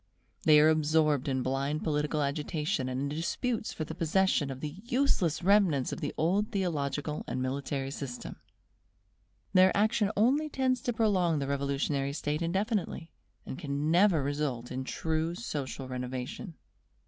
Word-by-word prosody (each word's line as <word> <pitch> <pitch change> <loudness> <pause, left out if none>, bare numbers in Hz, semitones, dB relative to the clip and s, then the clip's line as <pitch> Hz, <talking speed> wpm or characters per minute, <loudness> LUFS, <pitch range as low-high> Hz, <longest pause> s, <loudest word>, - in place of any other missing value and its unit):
They 150 -1 +7
are 155 +1 +6
absorbed 155 -2 +2
in 130 -2 0
blind 135 +4 -1
political 150 -1 0
agitation 150 0 -1
and 130 +1 -2
in 140 - -1
disputes 225 +6 -2
for 155 - -4
the 160 - -6
possession 170 -2 +1
of 130 -1 -6
the 150 +6 -6
useless 235 - +1
remnants 185 -9 +3
of - - -5
the 145 - -2
old 195 +7 +1
theological 150 -6 -2
and - - -3
military 135 +1 -2
system. 135 -3 -6 1.2
Their 185 0 +6
action 215 0 +2
only 275 +8 +3
tends 260 -3 0
to 245 - -1
prolong 190 -8 +2
the 140 - -1
revolutionary 140 0 -1
state 150 +1 -2
indefinitely, 190 -1 -1 0.3
and 130 - -6
can 145 -1 -1
never 175 -4 +4
result 140 -4 -2
in 130 +1 -4
true 160 +3 -1
social 140 - -5
renovation. 130 - -5
155 Hz, 150 wpm, -30 LUFS, 140-190 Hz, 1.2 s, They